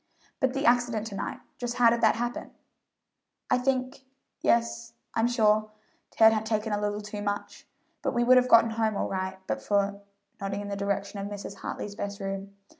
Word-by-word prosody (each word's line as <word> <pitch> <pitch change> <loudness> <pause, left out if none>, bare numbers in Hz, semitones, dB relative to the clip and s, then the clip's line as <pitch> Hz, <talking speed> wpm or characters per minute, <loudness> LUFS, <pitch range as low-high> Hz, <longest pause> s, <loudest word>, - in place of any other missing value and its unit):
"But 260 0 +1
the 275 - -1
accident 240 -2 +3
to 215 -3 -6
night, - - -4 0.2
just 240 -1 -3
how 240 -2 +5
did 235 0 0
that 220 -2 +5
happen?" 240 +1 -3 1.0
"I - - +4
think 255 +1 -1 0.4
yes, 235 0 +1 0.2
I'm 225 +1 +2
sure 215 -3 +3 0.4
Ted 220 0 +6
had 215 -1 0
taken 220 -1 -1
a 205 - 0
little 205 0 -1
too 210 0 -6
much; 205 0 -4 0.3
but - - 0
we 240 - +3
would 255 +1 +6
have 250 0 +3
gotten 230 -1 +6
home 220 -2 0
all - - -1
right 190 0 -3
but - - -2
for" 200 0 0 0.4
nodding 200 +1 -3
in 205 - -6
the 200 - -2
direction 200 0 -2
of 200 - -3
Mrs. 200 -1 -7
Hartley's 205 - -5
best 200 -1 -5
room. 195 0 -5
215 Hz, 190 wpm, -28 LUFS, 200-235 Hz, 1.0 s, Ted